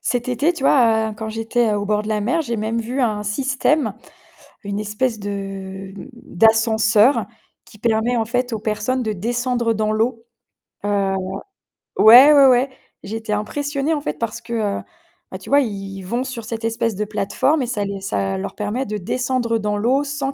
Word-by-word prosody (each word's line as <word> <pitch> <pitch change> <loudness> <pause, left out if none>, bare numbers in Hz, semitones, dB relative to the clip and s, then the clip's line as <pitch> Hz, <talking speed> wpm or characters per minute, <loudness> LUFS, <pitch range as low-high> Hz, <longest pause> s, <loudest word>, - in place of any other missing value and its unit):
Cet 245 -1 -1
été, 285 +8 +1
tu 300 - -7
vois, 225 -5 +3
heu, - - -8
quand 220 -1 -4
j'étais 225 +2 0
heu 210 - +1
au 205 - -3
bord 210 0 0
de 215 - -7
la 210 -1 0
mer, 250 +10 +1
j'ai 235 -7 -3
même 220 +2 -2
vu 240 +4 -4
un 210 -3 0
système, 260 +2 0 0.7
une 200 0 -3
espèce 215 +2 -2
de 195 -1 -6 0.2
d'ascenseur 220 +1 +3 0.4
qui 210 - -17
permet 230 +2 +1
en 225 - +1
fait 245 +1 -2
aux 225 - -1
personnes 220 +4 -2
de 215 - -1
descendre 235 +3 -1
dans 215 0 0
l'eau. 230 +1 -1 0.6
Heu. 200 -1 0 0.8
Ouais, 250 +7 +9
ouais 280 -2 +7
ouais. 255 +1 +4 0.3
J'étais 220 +1 -5
impressionnée 285 +8 -1
en 295 - -2
fait - - -4
parce 230 -2 -3
que, 235 0 -12 0.3
heu, - - -8 0.5
bah - - -5
tu - - -12
vois, 285 +1 +5
ils 195 -5 -5
vont 235 +8 -3
sur 245 -3 -6
cette 225 0 -5
espèce 225 -2 -1
de 210 - -2
plateforme 215 +8 0
et 250 - -2
ça 210 -4 -2
les 195 -1 -5
ça 100 - -2
leur - - -5
permet 210 +6 -2
de 210 +1 -4
descendre 240 +3 -1
dans 210 -1 -2
l'eau 255 +7 +2
sans 280 -1 -3
225 Hz, 190 wpm, -20 LUFS, 210-250 Hz, 0.8 s, Ouais